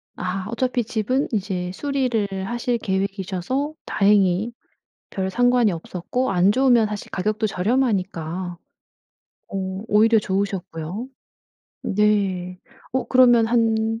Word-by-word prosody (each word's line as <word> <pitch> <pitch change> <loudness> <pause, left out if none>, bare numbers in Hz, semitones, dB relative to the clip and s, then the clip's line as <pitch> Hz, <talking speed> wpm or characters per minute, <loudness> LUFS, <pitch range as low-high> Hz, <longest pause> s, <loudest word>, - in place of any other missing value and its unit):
아. 185 +1 -3
어차피 250 +1 0
집은 240 +5 -1
이제 190 -4 -2
수리를 255 -4 0 0.2
하실 240 +1 -1
계획이셔서 195 - -2
다행히 200 +1 +3 0.6
별 190 -1 -2
상관이 245 -1 +3
없었고 180 +9 -3
안 185 +2 +4
좋으면 245 -3 +4
사실 210 -1 -6
가격도 215 +3 -1
저렴하니까. 185 -5 -1 0.9
오. 190 +1 -4
오히려 220 +2 +5
좋으셨고요. 190 0 -3 0.8
네. 190 -3 0 0.3
어 260 0 0
그러면 245 -3 +5
한 225 -1 +1
210 Hz, 245 characters per minute, -22 LUFS, 190-240 Hz, 0.9 s, 오히려